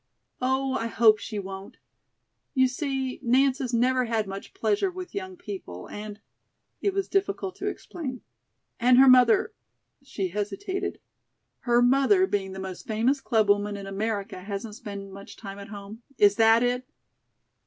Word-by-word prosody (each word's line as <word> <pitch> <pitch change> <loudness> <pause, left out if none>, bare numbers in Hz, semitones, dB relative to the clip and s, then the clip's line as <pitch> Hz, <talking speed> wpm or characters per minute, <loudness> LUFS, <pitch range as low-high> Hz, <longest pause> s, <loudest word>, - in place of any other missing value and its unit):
"Oh, 265 +1 +1
I 230 - -1
hope 220 -2 +5
she 215 - -6
won't. 195 0 -7 0.8
You 260 -1 +5
see, 265 -1 -3
Nance 265 +2 +3
has 255 -3 -3
never 255 +2 +2
had 225 -2 0
much 195 0 -8
pleasure 220 - +1
with 365 0 -8
young 375 -2 -5
people, 190 - -8
and" 210 0 -7 0.6
it 400 - +1
was 390 0 -1
difficult 390 -1 -1
to 395 - -4
explain 275 - -5 0.6
"and 245 +1 +5
her 270 +1 +8
mother 255 - +6 0.2
" - - -52
she 195 -6 -2
hesitated. 370 - -3 0.7
"Her 240 0 +5
mother, 275 +10 +4
being 195 - -2
the 190 - -7
most 190 +6 -7
famous 240 +5 +1
clubwoman 205 -3 +2
in 200 - -7
America, 200 -1 -3
hasn't 200 +3 -5
spent 200 -2 -8
much 200 +1 -11
time 200 -2 -8
at 200 - -9
home? 205 +2 -9 0.2
Is 205 -1 +5
that 225 +1 +5
it?" 250 +1 0
230 Hz, 155 wpm, -26 LUFS, 205-265 Hz, 0.8 s, her